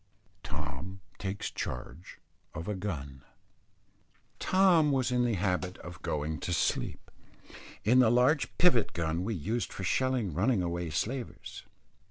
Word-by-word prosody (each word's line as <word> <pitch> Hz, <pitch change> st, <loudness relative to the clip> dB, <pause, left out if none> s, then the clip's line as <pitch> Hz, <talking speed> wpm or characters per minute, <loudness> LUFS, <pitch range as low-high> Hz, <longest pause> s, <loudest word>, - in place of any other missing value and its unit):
TOM 75 Hz, +5 st, -5 dB, 0.2 s
TAKES 100 Hz, 0 st, -3 dB
CHARGE 65 Hz, +7 st, -6 dB, 0.4 s
OF 80 Hz, +1 st, -5 dB
A 105 Hz, -, 0 dB
GUN. 75 Hz, -9 st, -5 dB, 1.2 s
Tom 180 Hz, -6 st, +4 dB
was 130 Hz, -2 st, +1 dB
in 125 Hz, 0 st, +3 dB
the 115 Hz, -3 st, +1 dB
habit 90 Hz, -1 st, -1 dB
of 85 Hz, -2 st, -10 dB
going 75 Hz, +1 st, -2 dB
to -, -, -3 dB
sleep, -, -, -1 dB, 0.7 s
in 120 Hz, +5 st, +5 dB
the 125 Hz, -3 st, +6 dB
large 125 Hz, +5 st, +3 dB
pivot 170 Hz, -11 st, +4 dB
gun 85 Hz, +1 st, -1 dB
we 110 Hz, +2 st, -1 dB
used 110 Hz, +8 st, -2 dB
for 95 Hz, -, -6 dB
shelling 125 Hz, -, +1 dB
running 100 Hz, -, +2 dB
away 85 Hz, -1 st, -2 dB
slavers. 120 Hz, -, -4 dB
95 Hz, 135 wpm, -30 LUFS, 85-125 Hz, 1.2 s, the